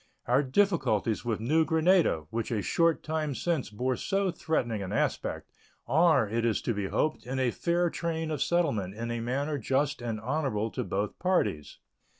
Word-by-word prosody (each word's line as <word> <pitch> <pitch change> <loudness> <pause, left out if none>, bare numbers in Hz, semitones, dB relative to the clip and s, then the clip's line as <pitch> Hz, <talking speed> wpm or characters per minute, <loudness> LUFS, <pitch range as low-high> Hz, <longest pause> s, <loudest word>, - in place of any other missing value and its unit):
Our 125 +3 +3
difficulties 135 - +1
with 115 -3 -1
New 155 +9 +2
Granada, 160 - +3
which 115 -1 -2
a 110 -4 -1
short 165 - +2
time 155 -3 -2
since 165 -4 -1
bore 125 +5 -1
so 195 +7 0
threatening 120 -10 -1
an 95 - -5
aspect, - - -2 0.3
are, 160 -7 +4
it 115 +3 -1
is 115 -3 +1
to 120 - 0
be 100 -2 -2
hoped, 155 +4 -1
in 130 +1 -3
a 130 -2 +1
fair 170 +3 0
train 160 -2 -2
of 150 -3 -2
settlement 125 - 0
in 115 +2 -4
a 120 - -2
manner 140 +5 -2
just 135 +3 0
and 115 -2 -3
honorable 115 -4 -1
to - - -3
both 100 +2 -3
parties. 105 - 0
130 Hz, 175 wpm, -29 LUFS, 110-160 Hz, 0.3 s, are